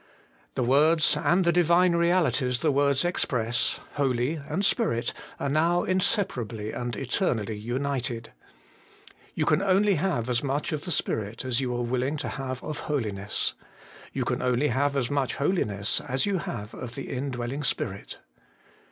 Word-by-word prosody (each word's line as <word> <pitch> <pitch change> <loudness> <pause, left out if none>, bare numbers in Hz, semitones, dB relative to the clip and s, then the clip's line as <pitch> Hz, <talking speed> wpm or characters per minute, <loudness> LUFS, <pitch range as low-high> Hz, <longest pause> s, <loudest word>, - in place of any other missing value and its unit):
The 125 - +1
words, 150 +6 +4
and 175 +4 +2
the 170 - +5
Divine 175 +1 +4
realities 170 -7 +2
the 155 - +3
words 140 +1 +2
express, 120 -9 0
Holy 130 -1 +1
and 155 +5 -2
Spirit, 195 - +1 0.3
are - - -1
now 165 +5 +2
inseparably 135 - 0
and 120 -2 -3
eternally 115 - -1
united. 120 +1 -3 1.0
You - - +1
can 155 +4 +3
only 200 +1 +4
have 125 -12 0
as 120 -1 +1
much 140 +1 -1
of 155 +1 -3
the 180 - -2
Spirit 110 -4 -2
as 130 0 +1
you 125 -2 -1
are 120 - -1
willing 130 +5 -1
to 145 - -3
have 130 -1 -5
of 150 - -4
holiness. 105 -8 -1 0.6
You - - -2
can - - -1
only 125 +3 +2
have 140 +3 +1
as 130 -2 0
much 135 -4 0
holiness 105 - 0
as 130 +1 +1
you 200 -3 0
have 105 -8 -5
of 120 -1 -7
the 140 - -6
indwelling 130 +1 -3
Spirit. 100 -7 -3
135 Hz, 155 wpm, -27 LUFS, 120-160 Hz, 1.0 s, the